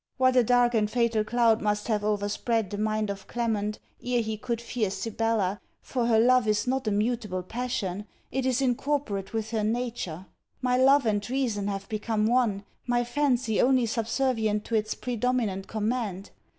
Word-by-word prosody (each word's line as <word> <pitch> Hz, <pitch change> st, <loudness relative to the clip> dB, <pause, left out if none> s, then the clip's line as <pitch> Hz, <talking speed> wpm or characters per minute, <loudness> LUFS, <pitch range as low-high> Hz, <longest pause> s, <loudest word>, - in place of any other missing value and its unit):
What 255 Hz, -1 st, +3 dB
a 250 Hz, -, +6 dB
dark 245 Hz, +1 st, +3 dB
and 215 Hz, -2 st, +2 dB
fatal 235 Hz, -2 st, +1 dB
cloud 230 Hz, 0 st, +3 dB
must 210 Hz, 0 st, -1 dB
have 215 Hz, -3 st, 0 dB
overspread 210 Hz, +1 st, 0 dB
the 205 Hz, -, -3 dB
mind 215 Hz, -1 st, 0 dB
of 195 Hz, -1 st, -8 dB
Clement, 215 Hz, -3 st, -1 dB, 0.3 s
ere 245 Hz, -1 st, +1 dB
he 220 Hz, 0 st, -3 dB
could 235 Hz, +1 st, -3 dB
fear 235 Hz, -3 st, -2 dB
Sibella, 215 Hz, -2 st, -1 dB, 0.2 s
for 245 Hz, -3 st, -1 dB
her 225 Hz, -2 st, +4 dB
love 250 Hz, 0 st, +4 dB
is 210 Hz, +2 st, +1 dB
not 260 Hz, -1 st, -1 dB
a -, -, +2 dB
mutable 210 Hz, -3 st, -1 dB
passion, 210 Hz, -3 st, -3 dB, 0.2 s
it 265 Hz, +1 st, -1 dB
is 260 Hz, +1 st, +1 dB
incorporate 245 Hz, -6 st, -1 dB
with 220 Hz, 0 st, -3 dB
her 220 Hz, -2 st, 0 dB
nature. 220 Hz, -6 st, -2 dB, 0.3 s
My 250 Hz, -1 st, +1 dB
love 270 Hz, +1 st, +5 dB
and 210 Hz, 0 st, 0 dB
reason 240 Hz, -6 st, -1 dB
have 195 Hz, -1 st, -4 dB
become 215 Hz, 0 st, -1 dB
one, 225 Hz, -4 st, +2 dB, 0.2 s
my 240 Hz, 0 st, +2 dB
fancy 245 Hz, -3 st, +1 dB
only 255 Hz, -1 st, +4 dB
subservient 225 Hz, -2 st, 0 dB
to 230 Hz, -, -2 dB
its 215 Hz, 0 st, 0 dB
predominant 240 Hz, -5 st, -1 dB
command. 215 Hz, -3 st, -2 dB
225 Hz, 170 wpm, -27 LUFS, 210-245 Hz, 0.3 s, a